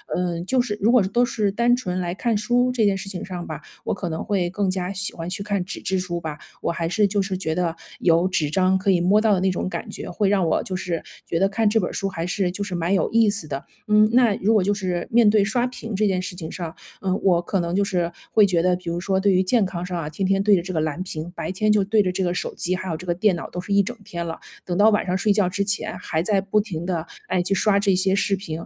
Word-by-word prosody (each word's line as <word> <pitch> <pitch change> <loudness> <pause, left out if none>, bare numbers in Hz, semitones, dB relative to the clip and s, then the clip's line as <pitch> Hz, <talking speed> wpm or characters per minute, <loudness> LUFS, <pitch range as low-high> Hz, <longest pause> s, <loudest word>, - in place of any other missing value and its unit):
嗯， 175 -1 -2
就 255 +6 +2
是 210 -4 -3
如 220 +4 +4
果 250 -2 +6
是 190 - -1
都 240 +4 +3
是 215 -4 0
单 235 +4 +3
纯 185 -7 -3
来 175 -1 -2
看 225 +3 0
书 245 +4 +2
这 235 -4 +2
件 200 -1 +3
事 195 0 -6
情 185 -3 -5
上 180 -2 -6
吧， 155 -3 -5 0.3
我 - - -1
可 185 -1 -4
能 160 0 -3
会 185 -4 0
更 195 0 0
加 185 0 -2
喜 200 +1 -3
欢 165 0 -5
去 195 - -4
看 200 -3 -1
纸 - - -7
质 190 - -1
书 175 -2 -3
吧。 155 -2 -5 0.2
我 - - 0
还 165 -1 -2
是 205 +4 +2
就 200 0 0
是 195 -1 -3
觉 160 -4 -2
得 170 -2 0 0.3
有 170 +1 +4
纸 170 -6 0
张 185 +2 +3
可 195 +1 +1
以 175 -2 +3
摸 195 +4 +4
到 215 -1 +3
的 190 - +2
那 190 +1 +2
种 180 - -2
感 - - -5
觉， - - -7
会 195 +2 +1
让 195 -3 +2
我 - - +2
就 185 - -5
是 180 -3 -2 0.2
觉 165 - -1
得 195 +1 +3
看 220 +2 +1
这 225 - +3
本 180 - -1
儿 - - -8
书 195 - -2
还 170 -3 -4
是 180 0 0
就 205 +3 -4
是 195 -3 -4
蛮 170 +2 0
有 195 - +2
意 225 -2 +4
思 200 -6 -3
的。 140 0 -5 0.2
嗯， 210 0 +5
那 240 -4 +5
如 210 +4 +1
果 210 -4 +4
就 205 +2 +1
是 180 -4 -2
面 230 -1 +5
对 210 -1 +5
刷 240 +4 +1
屏 230 -3 -5
这 215 +2 +2
件 190 -2 +1
事 185 0 -6
情 160 -3 -6
上， 165 -3 -6 0.3
嗯， 190 0 0
我 175 -3 +4
可 190 +2 -1
能 170 0 -3
就 200 - +3
是 175 -3 -1 0.2
会 215 - +6
觉 180 -4 +2
得 180 +1 +3
比 180 -1 -5
如 170 - -2
说 190 +1 0
对 195 0 +3
于 185 - +4
健 205 +3 +2
康 175 -2 -4
上 180 0 -4
啊， 165 -3 -3
天 165 +5 -4
天 195 +1 +2
对 205 0 +5
着 180 - +1
这 185 +2 -6
个 165 - -1
蓝 155 +2 -2
屏， 170 -2 -5
白 - - -3
天 210 +3 +1
就 210 -1 +4
对 210 +2 +3
着 185 - 0
这 185 +1 -1
个 175 - 0
手 - - -3
机， 180 +1 -1
还 185 0 -5
有 - - -1
这 180 +3 -10
个 175 - +1
电 190 +1 +2
脑 170 - -6
都 180 - -6
是 190 +3 -3
一 200 - +5
整 235 +5 -5
天 170 -4 -5
了， 165 - -5 0.3
等 175 -1 -2
到 210 +2 +6
晚 210 - +2
上 180 +1 +1
睡 210 +1 +2
觉 200 -3 +2
之 200 +2 -1
前 205 +1 -2
还 160 - -2
在 200 +3 +2
不 200 +2 +1
停 175 -6 -5
地， 170 -3 -2 0.2
哎， 185 -1 +1
去 190 +3 0
刷 200 0 +3
这 200 -2 +2
些 190 +1 +2
视 200 0 +1
频， 190 -4 -9
190 Hz, 325 characters per minute, -23 LUFS, 175-205 Hz, 0.3 s, 果